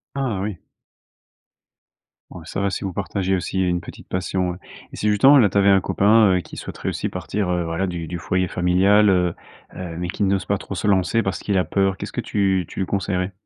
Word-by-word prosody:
Ah 125 -8 -2
oui. 100 -3 -4 1.7
Ouais, - - -10
ça - - -4
va 100 - +1
si 100 - -4
vous 95 -2 -3
partagez 95 0 -1
aussi 95 +1 -3
il 95 - +2
y - - +1
a - - +1
une 90 0 -1
petite - - -12
passion. 90 0 -2 0.4
Et - - -6
si 105 - 0
justement, 130 +8 +6
là 105 -6 +5
tu 100 - -1
avais 100 0 +5
un 95 -1 +5
copain, 105 +4 +4
heu, - - -1
qui - - -12
souhaiterait - - -5
aussi - - -3
partir, 100 -3 -3
heu, 90 -1 0
voilà 85 +3 -2
du 85 -2 -4
du 85 +2 -5
foyer 90 +3 0
familial, 95 +4 +3
heu, 90 -3 +2 0.4
heu, 85 -3 -6
mais 90 0 -3
qui 90 - -6
n'ose 95 -3 +1
pas 100 +1 0
trop 100 - -7
se 95 - -4
lancer 100 +4 +2
parce 95 - -2
qu'il 100 -2 -1
a 90 - +3
peur. 95 0 0
Qu'est-ce - - -6
que - - -2
tu 95 -3 0
tu - - -5
lui 95 - 0
conseillerais? 95 -1 -2
95 Hz, 235 wpm, -22 LUFS, 90-100 Hz, 1.7 s, justement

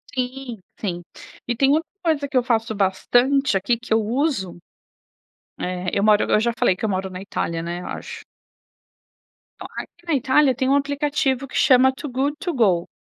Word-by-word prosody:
Sim, 255 -3 -4 0.2
sim, 175 -4 -3 0.5
e 240 - 0
tem 270 +4 +3
outra 320 +2 +1 0.2
coisa 310 -4 +1
que 275 - -10
eu 250 - +3
faço 225 -2 0
bastante 245 +7 +2
aqui, 200 +5 +1
que 240 -1 -3
eu 220 - +3
uso, 235 - -1 1.0
eh 180 0 -3
eu 200 - +1
moro 210 -1 +5
eu - - +5
já 235 +2 +1
falei 185 - +3
que 220 - -4
eu - - 0
moro 190 -1 -2
na 185 0 -8
Itália, 165 -4 -3
né, 175 +1 -4
acho. - - -7 1.3
Então, - - -8
aqui 340 - -9
na 330 - +1
Itália 265 +1 +3
tem 260 +1 0
um 275 - +4
aplicativo 280 -1 0
que - - -11
chama 260 0 +5
Too 285 +2 -7
Good 275 +4 0
To 360 -3 -3
Go. 195 - +2
245 Hz, 185 wpm, -22 LUFS, 200-275 Hz, 1.3 s, moro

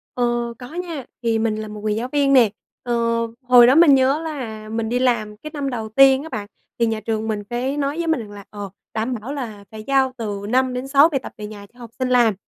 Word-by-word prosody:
Ờ, 240 -1 0
có 250 +4 -10
nha. 340 -7 -5 0.2
Thì 225 -1 +1
mình 220 -1 0
là 215 0 -5
một 210 0 -8
người 215 -1 0
giáo 240 +3 -2
viên 280 -2 +2
nè. 245 -5 +6 0.3
Ờ, 240 - -2 0.5
hồi 245 -1 +7
đó 260 - +5
mình 315 -4 +7
nhớ 270 +4 +2
là 230 -9 -6
mình 225 0 -2
đi 245 - 0
làm 215 -5 0
cái 305 +7 -9
năm 280 -2 -2
đầu 225 -4 -4
tiên 270 +3 +5
á 320 - -8
bạn, 205 -5 -5 0.3
thì 235 - +4
nhà 225 -1 -1
trường 220 0 -3
mình 210 -2 -2
cái 245 +6 -3
nói 285 +2 -1
với 340 -1 -2
mình 320 -4 +2
rằng 215 -3 -8
là, 205 -1 -10
ờ, 205 -1 -7 0.2
"Đảm 225 +3 -1
bảo 260 +6 -5
là 225 -8 -6
phải 215 -1 -8
giao 270 -1 +2
từ 205 -3 -4
5-6 260 +4 +3
bài 275 - -1
tập - - -7
về 210 -1 -6
nhà 205 -1 -10
cho 245 - -21
học 235 -1 -9
sinh 255 -1 0
làm," 240 -3 +4
240 Hz, 250 wpm, -21 LUFS, 220-270 Hz, 0.5 s, hồi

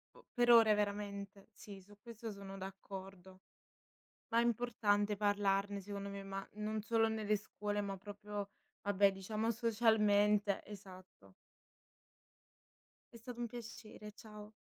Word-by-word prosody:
O - - -17
per 240 -1 +4
ore 225 -2 +8
veramente. 200 0 -3
Sì, 195 -1 -10
su 205 +2 -17
questo 230 -1 -7
sono 195 -1 -8
d'accordo. 190 -1 -9 0.9
Ma 230 - +3
è - - +4
importante 210 -3 +1
parlarne 200 -1 +1
secondo 200 0 -5
me, 200 0 -6
ma 195 0 -5
non 215 0 -2
solo 225 +1 +3
nelle 215 -1 +1
scuole, 205 0 -3
ma 195 -1 -3
proprio 205 +1 -6 0.3
vabbè, 200 0 +4
diciamo 215 +4 -1
socialmente 210 -3 +3
esatto. 185 - -12 1.8
È - - -9
stato 240 +1 -7
un 240 - 0
piacere, 220 -2 -8
ciao. 210 -1 -11
205 Hz, 125 wpm, -37 LUFS, 200-220 Hz, 1.8 s, ore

